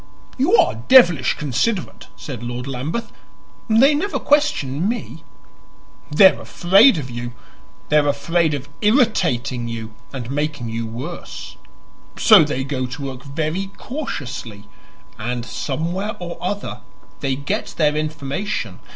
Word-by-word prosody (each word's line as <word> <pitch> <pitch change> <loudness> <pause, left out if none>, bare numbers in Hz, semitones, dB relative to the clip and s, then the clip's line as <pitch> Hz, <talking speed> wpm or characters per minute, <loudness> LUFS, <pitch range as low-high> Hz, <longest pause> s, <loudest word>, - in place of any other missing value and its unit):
"You 300 - +3
are - - +3
devilish 175 - +6
considerate," 150 - -2
said 130 -6 -7
Lord 120 +1 -5
Lambeth. 140 - -4 0.6
"They 250 +7 +6
never 355 +8 -1
question 200 - +1
me." 220 -9 -5 0.9
"They 190 +6 +7
are - - -10
afraid 195 +6 +5
of 130 -4 -5
you. 120 +1 -5 0.6
They 150 - +4
are 145 -1 +3
afraid 160 +2 +1
of 140 0 -6
irritating 210 - +2
you 115 -1 -6 0.2
and 130 -2 -6
making 145 -4 -2
you 115 0 -3
worse. 130 +10 -7 0.6
So 215 -7 +8
they 145 -3 -2
go 130 -2 -2
to 125 +3 -7
work 135 -1 -6
very 155 +6 -2
cautiously, 125 - -6 0.6
and, 120 +2 -3
somewhere 170 +12 -3
or 175 -1 -6
other, 200 +3 -3 0.4
they 135 -2 -1
get 140 +2 -3
their 150 -2 +3
information. 150 - -3
150 Hz, 130 wpm, -20 LUFS, 130-195 Hz, 0.9 s, So